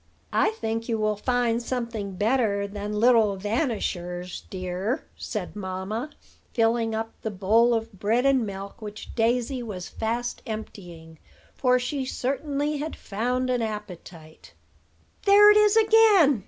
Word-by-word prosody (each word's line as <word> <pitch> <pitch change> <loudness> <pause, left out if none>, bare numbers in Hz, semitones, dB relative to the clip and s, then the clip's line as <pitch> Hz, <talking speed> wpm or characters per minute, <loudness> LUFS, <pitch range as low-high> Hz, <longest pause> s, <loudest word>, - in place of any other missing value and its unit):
"I - - +3
think 225 - -4
you 225 - +1
will 215 -1 +1
find 240 +1 0
something 235 -5 -4
better 210 -1 +1
than 205 +1 -4
'little 225 -3 +4
vanishers,' 190 - -2
dear," 185 - -3
said 210 -5 -5
mamma, 195 +6 -4 0.5
filling 225 -1 +2
up 225 +1 -4
the 220 - -2
bowl 220 +5 +3
of 225 0 -3
bread 230 +6 +1
and 270 -3 +4
milk 200 0 -7
which 210 0 -8
Daisy 245 +2 0
was 195 -6 -6
fast 235 +2 -3
emptying; 175 -7 -8 0.3
for 250 -1 +3
she 265 +2 -2
certainly 280 +3 -2
had 305 +2 -4
found 250 +5 -2
an 245 -1 0
appetite. 180 -7 -8 0.7
"There 415 +1 +8
it 420 - +5
is 425 +1 +5
again!" 430 - +5
225 Hz, 135 wpm, -25 LUFS, 200-250 Hz, 0.7 s, There